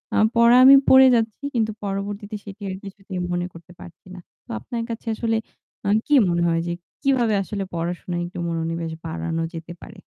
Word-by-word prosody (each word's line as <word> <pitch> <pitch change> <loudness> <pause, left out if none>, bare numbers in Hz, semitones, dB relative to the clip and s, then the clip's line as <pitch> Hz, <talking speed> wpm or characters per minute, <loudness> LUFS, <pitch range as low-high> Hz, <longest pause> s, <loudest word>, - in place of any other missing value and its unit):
আ - - +2 0.2
পড়া 235 +1 +6
আমি 270 +1 +10
পড়ে 265 0 +8
যাচ্ছি 225 +3 -1
কিন্তু 220 -1 +1
পরবর্তীতে 200 +2 -4
সেটির 200 -1 -7
কিছুতেই 195 -1 -8
মনে 175 0 -1
করতে 170 +1 -14
পারছি 175 - -14
না। 180 - -9 0.3
তো - - -37
আপনার 230 - -5
কাছে 230 +1 -6
আসলে 225 0 0 0.5
আ - - +2 0.2
কি 295 - -1 0.2
মনে 170 0 +1
হয় 165 0 +1
যে 170 - -1 0.3
কিভাবে 250 -6 +2
আসলে 200 0 -4
পড়াশোনায় 175 +1 -3
একটু 175 - -9
মনোনিবেশ 165 0 -3
বাড়ানো 165 0 -3
যেতে 165 +1 -7
পারে? 215 -3 -12
195 Hz, 180 wpm, -22 LUFS, 170-225 Hz, 0.5 s, আমি